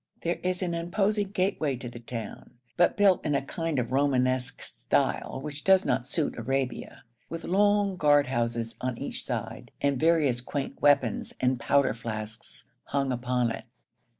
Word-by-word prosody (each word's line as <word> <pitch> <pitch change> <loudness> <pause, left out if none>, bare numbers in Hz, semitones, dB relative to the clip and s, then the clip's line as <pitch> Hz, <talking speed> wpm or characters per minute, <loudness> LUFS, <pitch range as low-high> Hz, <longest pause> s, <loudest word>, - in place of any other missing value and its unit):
There 170 +1 -1
is 185 0 -1
an 175 -2 -1
imposing 195 +4 0
gateway 185 -7 0
to 125 0 -7
the 120 0 -8
town 115 +1 -7 0.2
but 175 +7 +3
built 200 -3 +4
in 145 - 0
a - - +2
kind 165 +1 -3
of 125 -1 -1
Romanesque 130 -2 +1
style - - -1
which 150 -1 -6
does 190 -1 +5
not 120 - 0
suit 155 -6 -1
Arabia 130 +2 -3 0.3
with 165 0 -5
long 205 0 +2
guard 145 -3 +5
houses 115 -2 -2
on 125 -2 -2
each - - -3
side, - - -4
and 140 -2 +1
various 150 -7 +3
quaint 135 +2 -4
weapons 140 -6 +2
and 125 -1 +1
powder 135 +1 +3
flasks 110 -1 -6 0.2
hung 135 -1 0
upon 125 -1 0
it. - - -6
140 Hz, 160 wpm, -28 LUFS, 125-170 Hz, 0.3 s, does